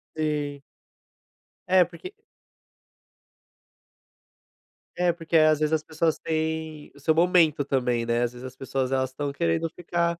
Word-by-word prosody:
Sim. 150 -2 -2 1.1
É, 185 -2 +6
porque 180 - -11 2.8
É, 175 -1 +2
porque 165 -1 0
às 155 -1 +5
vezes 155 +1 +1
as 155 -1 +1
pessoas 160 0 0
têm 160 -1 -3
o - - -15
seu 160 +3 +2
momento 165 -4 +4
também, 125 -4 0
né. 120 +1 +1
Às 120 0 -2
vezes 125 +1 -10
as 130 0 -9
pessoas, 135 -1 -2
elas 130 -1 +1
estão 140 +1 -3
querendo 85 - 0
ficar 170 0 -2
155 Hz, 135 wpm, -26 LUFS, 135-165 Hz, 2.8 s, É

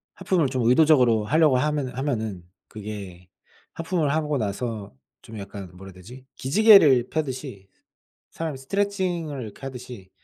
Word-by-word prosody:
하품을 170 -6 +1
좀 125 -2 -2
의도적으로 125 -5 +4
하려고 150 +1 +3
하면은 145 -2 -1
하면은 110 -9 -3 0.2
그게 100 -4 -9 0.5
하품을 165 -3 -1
하고 150 -2 0
나서 110 - -4 0.3
좀 110 -1 -10
약간 100 -1 -8
뭐라 95 +2 -12
해야 - - -13
되지? 120 +9 -13
기지개를 145 - +5
펴듯이 130 -9 -5 0.6
사람이 160 -4 -5
스트레칭을 175 -3 -2
이렇게 105 -3 -10
하듯이 125 -7 -9
130 Hz, 335 characters per minute, -24 LUFS, 105-155 Hz, 0.6 s, 기지개를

